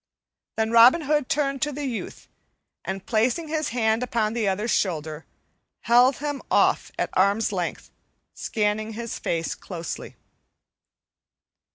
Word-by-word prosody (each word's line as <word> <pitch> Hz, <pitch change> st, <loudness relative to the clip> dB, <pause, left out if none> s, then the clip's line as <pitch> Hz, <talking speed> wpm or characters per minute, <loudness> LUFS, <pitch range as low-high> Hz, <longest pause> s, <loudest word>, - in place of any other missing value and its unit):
Then 220 Hz, 0 st, 0 dB
Robin 235 Hz, +8 st, +7 dB
Hood 295 Hz, -2 st, 0 dB
turned 275 Hz, -2 st, 0 dB
to 295 Hz, -, 0 dB
the 290 Hz, +1 st, -5 dB
youth, 245 Hz, -5 st, -6 dB, 0.6 s
and, 190 Hz, 0 st, -5 dB
placing 250 Hz, +8 st, 0 dB
his 310 Hz, -1 st, -1 dB
hand 225 Hz, -1 st, +1 dB
upon 225 Hz, -3 st, -1 dB
the 230 Hz, -3 st, -1 dB
other's 205 Hz, +4 st, -1 dB
shoulder, 160 Hz, -4 st, -2 dB, 0.5 s
held 245 Hz, +3 st, +5 dB
him 290 Hz, -1 st, -4 dB
off -, -, +2 dB
at -, -, -2 dB
arm's 200 Hz, +4 st, +2 dB
length, 180 Hz, -3 st, -4 dB, 0.4 s
scanning 215 Hz, 0 st, -2 dB
his 235 Hz, +1 st, -5 dB
face 165 Hz, -1 st, -2 dB
closely. 170 Hz, -3 st, -7 dB
225 Hz, 130 wpm, -24 LUFS, 205-265 Hz, 0.6 s, Robin